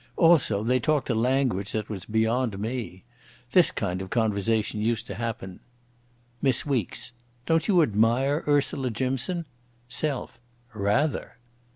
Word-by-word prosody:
Also 155 Hz, -, +4 dB
they 125 Hz, +3 st, +2 dB
talked 145 Hz, +1 st, +1 dB
a -, -, +2 dB
language 120 Hz, -4 st, +1 dB
that 110 Hz, -1 st, -2 dB
was 100 Hz, -3 st, -6 dB
beyond 110 Hz, 0 st, 0 dB
me. 110 Hz, -3 st, -4 dB, 0.5 s
This 180 Hz, +1 st, +6 dB
kind 90 Hz, -2 st, -3 dB
of 95 Hz, -, -7 dB
conversation 110 Hz, -1 st, 0 dB
used 115 Hz, 0 st, 0 dB
to -, -, -6 dB
happen.—MISS 120 Hz, +4 st, -4 dB
WEEKES: 125 Hz, -3 st, -2 dB, 0.3 s
"Don't 165 Hz, 0 st, +2 dB
you 180 Hz, -6 st, +5 dB
admire 120 Hz, +6 st, +2 dB
Ursula 140 Hz, -2 st, +2 dB
Jimson?" 130 Hz, -, -2 dB, 0.4 s
SELF: 130 Hz, 0 st, -3 dB, 0.3 s
"Rather!" 110 Hz, +8 st, 0 dB
120 Hz, 125 wpm, -26 LUFS, 110-135 Hz, 0.5 s, This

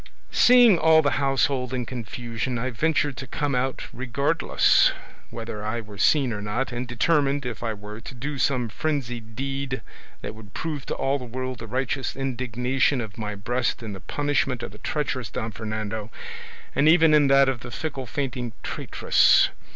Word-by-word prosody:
"Seeing 240 Hz, -7 st, +7 dB
all 160 Hz, 0 st, +6 dB
the 135 Hz, -4 st, +1 dB
household 135 Hz, -1 st, +1 dB
in 125 Hz, -1 st, -2 dB
confusion, 120 Hz, +1 st, -4 dB
I 130 Hz, +3 st, -2 dB
ventured 145 Hz, +1 st, +1 dB
to 135 Hz, -, -6 dB
come 145 Hz, +2 st, -2 dB
out 130 Hz, +1 st, -1 dB
regardless 130 Hz, +2 st, +3 dB, 0.4 s
whether 115 Hz, -2 st, -6 dB
I 110 Hz, +2 st, -2 dB
were 105 Hz, -3 st, -10 dB
seen 135 Hz, -3 st, +3 dB
or 105 Hz, -, -4 dB
not, 110 Hz, +6 st, -2 dB
and 120 Hz, +1 st, -4 dB
determined, 140 Hz, +3 st, +1 dB
if 120 Hz, -3 st, -5 dB
I 115 Hz, -2 st, -2 dB
were, 105 Hz, +2 st, -9 dB
to 130 Hz, -, -9 dB
do 140 Hz, +3 st, -4 dB
some 125 Hz, -3 st, +1 dB
frenzied 120 Hz, -4 st, -3 dB
deed 135 Hz, 0 st, -3 dB, 0.4 s
that -, -, -4 dB
would 105 Hz, -3 st, -14 dB
prove 150 Hz, -4 st, -4 dB
to -, -, -2 dB
all 135 Hz, +1 st, 0 dB
the 125 Hz, -, -7 dB
world 130 Hz, +1 st, -5 dB
the 115 Hz, -, -7 dB
righteous 130 Hz, +2 st, -2 dB
indignation 130 Hz, +1 st, 0 dB
of 110 Hz, -2 st, -6 dB
my 105 Hz, -1 st, -3 dB
breast 120 Hz, +4 st, -1 dB
in 110 Hz, -2 st, -5 dB
the 95 Hz, -, -7 dB
punishment 140 Hz, 0 st, -1 dB
of -, -, -5 dB
the 105 Hz, -, -13 dB
treacherous 140 Hz, -4 st, -2 dB
Don 115 Hz, -2 st, -4 dB
Fernando, 110 Hz, 0 st, -4 dB, 0.6 s
and 150 Hz, +2 st, +4 dB
even 165 Hz, -1 st, +6 dB
in 150 Hz, -2 st, +5 dB
that 135 Hz, 0 st, +6 dB
of 130 Hz, -2 st, 0 dB
the 120 Hz, -, -8 dB
fickle 135 Hz, -1 st, -4 dB
fainting 125 Hz, -3 st, -3 dB
traitress. -, -, +3 dB
125 Hz, 175 wpm, -25 LUFS, 115-140 Hz, 0.6 s, Seeing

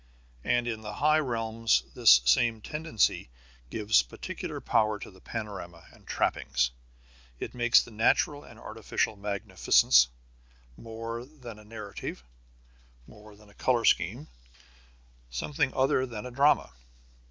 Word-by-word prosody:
And 120 Hz, 0 st, +1 dB
in 110 Hz, -2 st, -3 dB
the 105 Hz, -1 st, -7 dB
higher 155 Hz, +1 st, +3 dB
realms 115 Hz, -3 st, 0 dB
this 60 Hz, 0 st, +7 dB
same 115 Hz, -, +3 dB
tendency 150 Hz, -, -1 dB, 0.4 s
gives 105 Hz, -, +3 dB
particular -, -, -7 dB
power 110 Hz, -1 st, +1 dB
to 105 Hz, -, -10 dB
the 95 Hz, -1 st, -19 dB
panorama 100 Hz, -7 st, -7 dB
and -, -, -21 dB
trappings. 60 Hz, 0 st, 0 dB, 0.7 s
It -, -, -6 dB
makes 120 Hz, -1 st, +4 dB
the -, -, -13 dB
natural 135 Hz, +6 st, +1 dB
and 115 Hz, -, -15 dB
artificial 110 Hz, -1 st, -2 dB
magnificence 100 Hz, -10 st, +3 dB, 0.7 s
more 115 Hz, -, -7 dB
than 125 Hz, -6 st, -12 dB
a -, -, -14 dB
narrative, 105 Hz, -, -7 dB, 0.8 s
more 105 Hz, -, -15 dB
than 105 Hz, 0 st, -19 dB
a -, -, -21 dB
color 120 Hz, +1 st, +1 dB
scheme, -, -, +1 dB, 1.0 s
something 130 Hz, -, -1 dB
other 130 Hz, 0 st, +2 dB
than 115 Hz, -2 st, -7 dB
a 125 Hz, -, -7 dB
drama. 140 Hz, -, +3 dB
110 Hz, 130 wpm, -28 LUFS, 105-120 Hz, 1.0 s, this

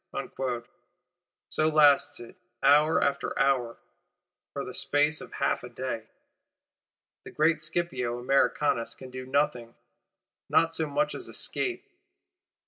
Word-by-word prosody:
So 155 Hz, -, +2 dB
lasts 150 Hz, -2 st, +4 dB
it, 120 Hz, +8 st, -11 dB, 0.3 s
hour 150 Hz, +3 st, +5 dB
after 140 Hz, -, -1 dB
hour; 130 Hz, -4 st, +1 dB, 0.7 s
for -, -, -5 dB
the -, -, -7 dB
space 150 Hz, +2 st, +1 dB
of -, -, -10 dB
half -, -, -1 dB
a 125 Hz, -, -8 dB
day. 120 Hz, -2 st, -5 dB, 1.2 s
The -, -, -10 dB
great 155 Hz, +1 st, +1 dB
Scipio 155 Hz, -7 st, -2 dB
Americanus 125 Hz, -1 st, +1 dB
can 130 Hz, -1 st, -11 dB
do 130 Hz, 0 st, -7 dB
nothing; 125 Hz, -4 st, -1 dB, 0.7 s
not 165 Hz, 0 st, +3 dB
so 160 Hz, -1 st, -1 dB
much 220 Hz, -, 0 dB
as -, -, -6 dB
escape. 370 Hz, -1 st, 0 dB
140 Hz, 120 wpm, -28 LUFS, 125-155 Hz, 1.2 s, hour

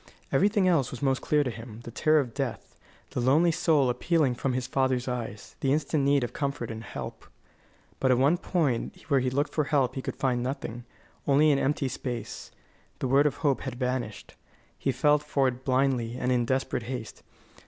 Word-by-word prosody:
Everything 200 Hz, +6 st, +3 dB
else 160 Hz, -8 st, +3 dB
was 130 Hz, -, -7 dB
most 135 Hz, -1 st, +1 dB
clear 150 Hz, -1 st, +2 dB
to 125 Hz, -, -2 dB
him: 115 Hz, 0 st, -9 dB
the 120 Hz, -, -8 dB
terror 155 Hz, +5 st, +3 dB
of 125 Hz, -5 st, -2 dB
death; 135 Hz, -1 st, -4 dB, 0.4 s
the -, -, -2 dB
lonely 145 Hz, +8 st, +4 dB
soul 155 Hz, -4 st, +3 dB
appealing 135 Hz, +2 st, +1 dB
from 130 Hz, +1 st, -2 dB
his 125 Hz, 0 st, -1 dB
father's 130 Hz, -1 st, 0 dB
eyes; 120 Hz, -4 st, -5 dB
the 135 Hz, -, +1 dB
instant 145 Hz, 0 st, +1 dB
need 140 Hz, -1 st, +3 dB
of 120 Hz, -, -4 dB
comfort 140 Hz, -5 st, -3 dB
and 110 Hz, 0 st, -7 dB
help. -, -, -7 dB, 0.7 s
But 130 Hz, -, +2 dB
at 130 Hz, -, +5 dB
the 125 Hz, -, +1 dB
one 160 Hz, +6 st, +3 dB
point 150 Hz, -13 st, -1 dB
where 140 Hz, -2 st, +4 dB
he 130 Hz, 0 st, 0 dB
looked 140 Hz, +3 st, -1 dB
for 155 Hz, -, +1 dB
help 135 Hz, -4 st, +1 dB
he 130 Hz, -, -4 dB
could -, -, -5 dB
find 125 Hz, -2 st, 0 dB
nothing; 120 Hz, -2 st, -4 dB, 0.4 s
only 145 Hz, +2 st, +5 dB
an 140 Hz, -, +2 dB
empty 140 Hz, 0 st, 0 dB
space. 120 Hz, -3 st, -5 dB, 0.5 s
The -, -, -2 dB
word 140 Hz, +3 st, +4 dB
of 145 Hz, -, -2 dB
hope 140 Hz, -2 st, +2 dB
had 130 Hz, -3 st, -5 dB
vanished. 125 Hz, -4 st, -3 dB, 0.4 s
He -, -, -1 dB
felt 150 Hz, 0 st, +3 dB
for 140 Hz, -2 st, +1 dB
it 130 Hz, 0 st, -3 dB
blindly 130 Hz, -3 st, +1 dB
and 125 Hz, 0 st, 0 dB
in 120 Hz, -1 st, +2 dB
desperate 130 Hz, 0 st, -1 dB
haste. 125 Hz, -5 st, -6 dB
130 Hz, 200 wpm, -28 LUFS, 125-145 Hz, 0.7 s, at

